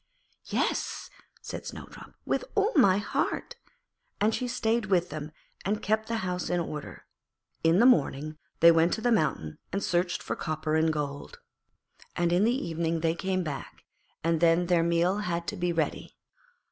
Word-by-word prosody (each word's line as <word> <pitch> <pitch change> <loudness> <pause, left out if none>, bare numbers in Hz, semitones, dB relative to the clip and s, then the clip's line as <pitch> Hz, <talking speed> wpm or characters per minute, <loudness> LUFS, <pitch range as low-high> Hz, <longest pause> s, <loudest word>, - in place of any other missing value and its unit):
'Yes,' - - -2 0.3
said - - -6
Snowdrop, - - -10
'with - - 0
all 420 +3 +2
my 200 - +6
heart'; 220 - -2 0.6
and 215 +2 +2
she 250 - -1
stayed 225 -1 0
with 180 -3 +1
them 155 0 -6 0.3
and 210 +3 -1
kept 220 +1 +1
the 230 - -1
house 180 -1 -2
in 175 - +1
order. 150 -3 -6 0.6
In 165 +2 +4
the 235 - +5
morning 155 - +2 0.2
they 170 +1 +9
went 165 +1 +3
to 220 - -2
the 245 +1 +2
mountain 140 - 0
and 200 +1 -2
searched 175 0 0
for - - -3
copper 155 -1 -3
and 160 0 +3
gold, 150 - -5 0.8
and 175 0 +1
in 185 +4 +4
the 250 +4 0
evening 165 0 -1
they 165 0 +2
came 185 +1 -1
back 145 -4 -7 0.4
and 165 0 +2
then 170 +1 +4
their 175 -1 +3
meal 170 +4 +2
had 170 -4 -2
to - - -5
be 180 -2 0
ready. 165 -2 -2
175 Hz, 170 wpm, -28 LUFS, 160-210 Hz, 0.8 s, they